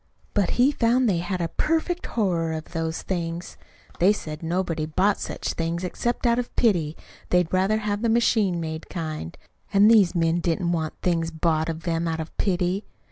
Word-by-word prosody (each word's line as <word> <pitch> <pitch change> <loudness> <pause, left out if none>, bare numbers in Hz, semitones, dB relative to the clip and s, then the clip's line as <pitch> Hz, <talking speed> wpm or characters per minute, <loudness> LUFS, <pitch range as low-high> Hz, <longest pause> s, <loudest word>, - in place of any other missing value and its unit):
But 205 -3 +2
he 255 +3 +5
found 245 -1 +2
they 185 -5 +2
had 175 +1 -2
a 170 - 0
perfect 330 - -1
horror 170 -7 0
of 160 0 -6
those 165 -1 -3
things. 170 -1 -4 0.4
They 185 +4 +6
said 155 -7 -5
nobody 165 -2 -1
bought 190 +6 +2
such - - -4
things 170 +1 -2
except 240 +7 -2
out 235 0 +3
of 245 - -5
pity 170 -9 +2 0.3
they'd 180 -1 +2
rather 190 +4 +3
have 210 -1 -2
the 230 - +1
machine 220 -6 +2
made 160 -1 -5
kind. 155 - -5 0.3
And 205 +2 +6
these 195 -6 +5
men 165 0 +2
didn't 170 +1 0
want 160 -2 -2
things 165 -2 +1
bought 160 0 0
of 165 0 -5
them 170 -1 -1
out 165 0 -2
of 160 0 -6
pity. 185 0 0
175 Hz, 185 wpm, -25 LUFS, 165-205 Hz, 0.4 s, They